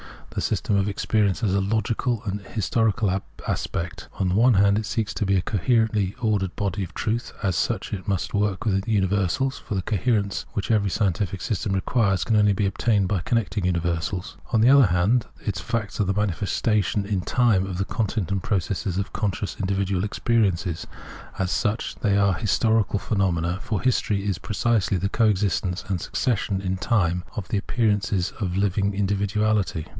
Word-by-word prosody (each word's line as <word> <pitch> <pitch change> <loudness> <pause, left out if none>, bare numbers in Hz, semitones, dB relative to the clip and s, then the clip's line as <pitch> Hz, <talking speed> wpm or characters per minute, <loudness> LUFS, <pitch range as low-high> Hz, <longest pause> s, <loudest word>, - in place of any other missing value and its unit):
The - - -3
system 100 - 0
of 100 0 +1
experience 105 0 0
has 105 -5 +1
a 100 - +3
logical 110 +3 -1
and 100 0 -2
an 100 - -15
historical 110 -2 +1 0.3
aspect. 85 +1 -3
On 95 - -1
the - - 0
one 120 +2 +5
hand 100 +1 +4
it 110 - -4
seeks 110 0 -2
to 105 - -1
be 100 0 +2
a 95 - +3
coherently 105 0 +1
ordered 100 -5 0
body 100 -1 -2
of 90 - -8
truth: 115 +2 -2
as 95 -3 +1
such, - - -1
it 95 -4 -5
must 100 -3 -1
work 100 -1 0
with 95 -2 0
universals, 100 +5 +1
for 105 - -5
the 95 - 0
coherence 105 0 0
which 100 +2 -2
every 105 -3 +2
scientific 95 -1 -1
system 100 +3 -1
requires 95 0 +1
can 110 -2 +2
only 105 -1 +4
be 100 0 0
obtataed 100 0 +1
by 100 -1 0
connecting 105 0 -1
universals. 90 +2 -2 0.2
On 110 - +4
the 120 - +6
other 135 -4 +7
hand, 95 +7 +2 0.2
its 100 -3 -2
facts 110 +2 -3
are 105 - +3
the 95 - 0
manifestations 105 +1 0
in 100 -3 0
time 110 -3 +2
of 95 -2 -4
the 95 - 0
content 105 -4 -2
and 100 -1 0
processes 95 -1 -1
of 100 +1 -3
conscious 105 -1 -2
individual 95 -1 0
experience: 105 -5 +1 0.7
as 95 -1 -1
such, 105 +4 -1
they 100 -1 +1
are 100 -1 +3
historical 110 +2 +1
phenomena, 90 -4 0
for 105 -4 -2
history 105 -5 +1
is 100 -3 -1
precisely 105 -2 +1
the 95 +3 -1
co 115 +2 +2
existence 95 -3 0
and 95 -3 0
succession 105 -5 -1
in 95 -1 -2
time 90 -5 +1
of 105 -6 -5
the 105 - 0
appearances 105 -3 0
of 90 -5 -2
a - - +1
living 100 0 +1
individuality. 100 -3 0
100 Hz, 180 wpm, -24 LUFS, 95-110 Hz, 0.7 s, other